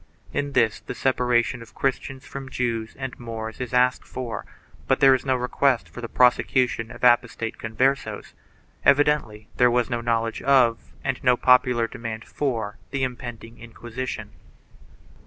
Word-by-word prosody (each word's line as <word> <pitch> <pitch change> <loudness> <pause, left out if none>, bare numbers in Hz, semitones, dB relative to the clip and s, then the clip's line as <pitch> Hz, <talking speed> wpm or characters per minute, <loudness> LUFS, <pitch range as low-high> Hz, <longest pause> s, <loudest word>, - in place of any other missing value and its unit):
In 145 0 -2
this 115 -4 +2
the - - -7
separation 125 -2 +1
of 115 - -14
Christians 135 0 -2
from 135 -1 -8
Jews 115 -4 -2
and 130 -2 -6
Moors 110 -1 -6
is 125 - -4
asked 125 0 +2
for, 125 -3 -6 0.4
but 135 - +2
there 135 -2 +7
is 130 +1 -1
no 130 - +3
request 125 0 +1
for 120 - -10
the 115 - -6
prosecution 125 -2 +2
of - - -12
apostate 120 -2 +2
Converses.5 130 +5 -1 0.5
Evidently 140 -7 +2
there 125 - +5
was 120 +1 +1
no 120 -1 -1
knowledge 115 -1 -1
of 130 -4 +3
and 135 -2 -2
no 125 -2 +4
popular 125 -2 +4
demand 115 -1 -6
for 115 -7 -3
the 140 -1 -2
impending 120 -2 -6
Inquisition. 120 +2 -6
125 Hz, 150 wpm, -24 LUFS, 115-130 Hz, 0.5 s, there